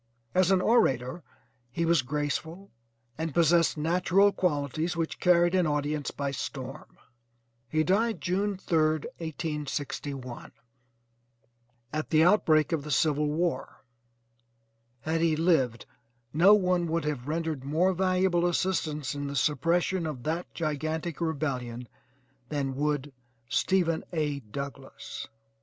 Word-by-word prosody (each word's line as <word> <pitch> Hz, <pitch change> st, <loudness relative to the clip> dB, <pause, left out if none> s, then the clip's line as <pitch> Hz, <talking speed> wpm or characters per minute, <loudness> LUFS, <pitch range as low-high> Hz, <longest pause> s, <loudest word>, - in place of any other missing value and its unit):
As 185 Hz, -1 st, +3 dB
an 190 Hz, -1 st, +4 dB
orator 160 Hz, -, +2 dB, 0.5 s
he 165 Hz, +7 st, -1 dB
was 165 Hz, -3 st, +4 dB
graceful, 150 Hz, +7 st, -3 dB, 0.5 s
and 160 Hz, -3 st, -3 dB
possessed 170 Hz, -1 st, +4 dB
natural 180 Hz, +5 st, +3 dB
qualities 155 Hz, -1 st, -1 dB
which 165 Hz, -1 st, -2 dB
carried 175 Hz, 0 st, +4 dB
an 180 Hz, -3 st, +3 dB
audience 150 Hz, 0 st, -1 dB
by 140 Hz, -1 st, -3 dB
storm. 135 Hz, -, -7 dB, 0.7 s
He 155 Hz, +3 st, +2 dB
died 220 Hz, +6 st, +1 dB
June 195 Hz, +2 st, -1 dB
3rd, 155 Hz, -4 st, +1 dB
1861, 145 Hz, -5 st, -5 dB, 1.4 s
at 155 Hz, 0 st, -2 dB
the 155 Hz, 0 st, +5 dB
outbreak 160 Hz, -5 st, +4 dB
of 160 Hz, -4 st, 0 dB
the 150 Hz, -, -7 dB
civil 150 Hz, +1 st, +2 dB
war. 165 Hz, 0 st, -2 dB, 1.2 s
Had 160 Hz, +3 st, -1 dB
he 165 Hz, -2 st, +3 dB
lived 155 Hz, -8 st, +1 dB, 0.5 s
no 185 Hz, +7 st, +7 dB
one 180 Hz, -3 st, +1 dB
would 165 Hz, 0 st, -1 dB
have 140 Hz, -4 st, -3 dB
rendered 160 Hz, -3 st, -2 dB
more 165 Hz, +7 st, +2 dB
valuable 185 Hz, -1 st, +2 dB
assistance 160 Hz, -6 st, -1 dB
in 145 Hz, 0 st, -4 dB
the 140 Hz, -, -5 dB
suppression 165 Hz, +5 st, +1 dB
of 135 Hz, -6 st, -6 dB
that 165 Hz, +3 st, -3 dB
gigantic 155 Hz, +1 st, -3 dB
rebellion 130 Hz, -7 st, -2 dB, 0.6 s
than 140 Hz, -3 st, -2 dB
would 145 Hz, -1 st, -1 dB, 0.4 s
Stephen 170 Hz, +2 st, +1 dB
A. 150 Hz, -4 st, -1 dB
Douglass. 135 Hz, -1 st, -7 dB
160 Hz, 120 wpm, -28 LUFS, 145-175 Hz, 1.4 s, no